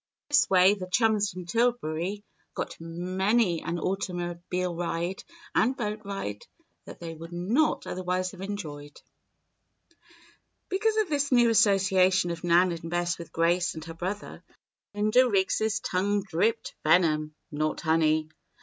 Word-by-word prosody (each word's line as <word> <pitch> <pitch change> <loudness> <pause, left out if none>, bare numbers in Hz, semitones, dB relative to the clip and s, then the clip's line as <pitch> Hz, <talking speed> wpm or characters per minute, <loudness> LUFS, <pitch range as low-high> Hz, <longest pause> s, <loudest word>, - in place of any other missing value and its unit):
In - - -66
this 290 -1 +4
way 185 +1 +6
the 185 -3 -6
chums 215 -1 +3
from 180 -1 -8
Tillbury 205 -3 -1 0.3
got - - -4
many 185 +3 0
an 170 +1 -3
automobile 180 -1 -3
ride 175 +2 -3 0.3
and 255 +4 +2
boat 210 -3 -3
ride 195 - -5 0.4
that - - -11
they 165 -1 -6
would 165 +1 -10
not 210 - +1
otherwise 185 0 -2
have 190 - -12
enjoyed. 150 -8 -6 1.7
Because 430 +3 +1
of 430 -4 +1
this 285 -1 0
new 240 -2 +5
association 190 -3 +3
of 170 0 -6
Nan 175 +1 +4
and 165 -1 -6
Bess 175 0 -1
with 170 - -9
Grace 170 +2 +1
and 160 0 -7
her 165 - -7
brother, 185 +5 -5 0.5
Linda 215 +5 +4
Riggs' 215 +2 +1
tongue 200 +2 0
dripped 210 +5 -1
venom, 155 -3 +3 0.2
not 155 +1 -2
honey. 155 -1 +2
185 Hz, 140 wpm, -27 LUFS, 170-210 Hz, 1.7 s, way